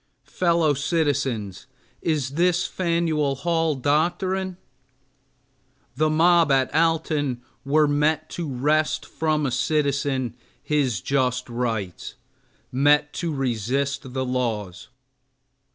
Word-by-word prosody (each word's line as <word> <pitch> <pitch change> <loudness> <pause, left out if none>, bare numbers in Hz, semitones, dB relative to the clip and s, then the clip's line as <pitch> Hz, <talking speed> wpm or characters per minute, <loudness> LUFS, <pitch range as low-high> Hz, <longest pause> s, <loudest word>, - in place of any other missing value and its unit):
Fellow 170 -1 +2
citizens, 135 - -1 0.3
is 150 -5 -1
this 175 +3 +2
Fanueil 165 -5 0
Hall 165 +1 0
doctrine? 175 +7 0 1.4
The 155 0 +2
mob 165 0 +4
at 135 -1 +2
Alton 155 -5 +1 0.2
were 150 +2 +3
met 150 +2 +1
to 165 -5 -4
wrest 150 +5 +1
from 155 -2 -1
a 135 - -1
citizen 140 -2 0 0.3
his 135 -10 0
just 130 +1 0
rights, 115 -6 -3 0.6
met 145 +3 +3
to 170 -2 -2
resist 135 +1 -2
the 130 0 -1
laws. 115 -8 -3
145 Hz, 100 wpm, -24 LUFS, 130-160 Hz, 1.4 s, mob